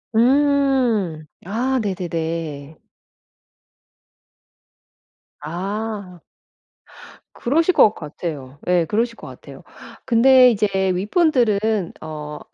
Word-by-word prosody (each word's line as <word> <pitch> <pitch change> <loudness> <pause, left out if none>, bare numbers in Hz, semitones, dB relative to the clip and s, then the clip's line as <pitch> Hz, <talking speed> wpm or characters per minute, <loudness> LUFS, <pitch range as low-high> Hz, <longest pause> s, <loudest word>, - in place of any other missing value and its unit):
음. 255 - +2 0.2
아 250 +7 -1
네네네. 165 -6 -4 2.6
아. 195 +2 -5 1.1
그러실 320 +8 +1
것 215 - +5
같아요. 150 -5 -7
예. 180 -2 +2
그러실 230 +7 -1
것 - - -12
같아요. - - -13 0.4
근데 255 +1 +6
이제 210 -2 +1 0.3
윗분들은 215 - +1
어 150 -1 -7
205 Hz, 145 characters per minute, -20 LUFS, 165-245 Hz, 2.6 s, 근데